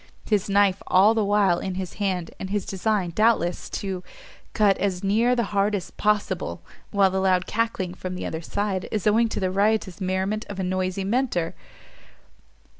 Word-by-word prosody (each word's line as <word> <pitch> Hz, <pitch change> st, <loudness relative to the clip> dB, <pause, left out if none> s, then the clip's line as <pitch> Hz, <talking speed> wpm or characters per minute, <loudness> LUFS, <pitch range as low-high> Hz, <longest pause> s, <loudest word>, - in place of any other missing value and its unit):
his 205 Hz, -2 st, +1 dB
knife 200 Hz, -1 st, +3 dB
all 200 Hz, +4 st, +5 dB
the 225 Hz, -1 st, +1 dB
while 200 Hz, -3 st, +3 dB
in 190 Hz, -1 st, -4 dB
his 185 Hz, -1 st, -4 dB
hand, 185 Hz, -4 st, -1 dB
and 190 Hz, -, -5 dB
his 205 Hz, -1 st, -1 dB
design, 195 Hz, -2 st, -1 dB
doubtless, 215 Hz, -4 st, +1 dB
to 190 Hz, -2 st, -4 dB, 0.5 s
cut 205 Hz, -2 st, +4 dB
as 190 Hz, -2 st, -1 dB
near 225 Hz, +5 st, +3 dB
the 235 Hz, -, +1 dB
heart 205 Hz, +1 st, +2 dB
as 185 Hz, -3 st, -5 dB
possible! 210 Hz, -1 st, -1 dB, 0.3 s
while 195 Hz, -2 st, +3 dB
the 190 Hz, -, 0 dB
loud 185 Hz, -1 st, +2 dB
cackling 215 Hz, -5 st, -1 dB
from 185 Hz, 0 st, -6 dB
the -, -, -5 dB
other 160 Hz, -, -4 dB
side 195 Hz, +1 st, -2 dB
is 215 Hz, -4 st, -2 dB
owing 225 Hz, +2 st, +4 dB
to -, -, -3 dB
the 185 Hz, -1 st, 0 dB
riotous 200 Hz, -1 st, +1 dB
merriment 190 Hz, +3 st, -1 dB
of 200 Hz, -1 st, -6 dB
a -, -, -1 dB
noisy 185 Hz, +1 st, -1 dB
Mentor! 200 Hz, -6 st, 0 dB
195 Hz, 180 wpm, -24 LUFS, 185-210 Hz, 0.5 s, all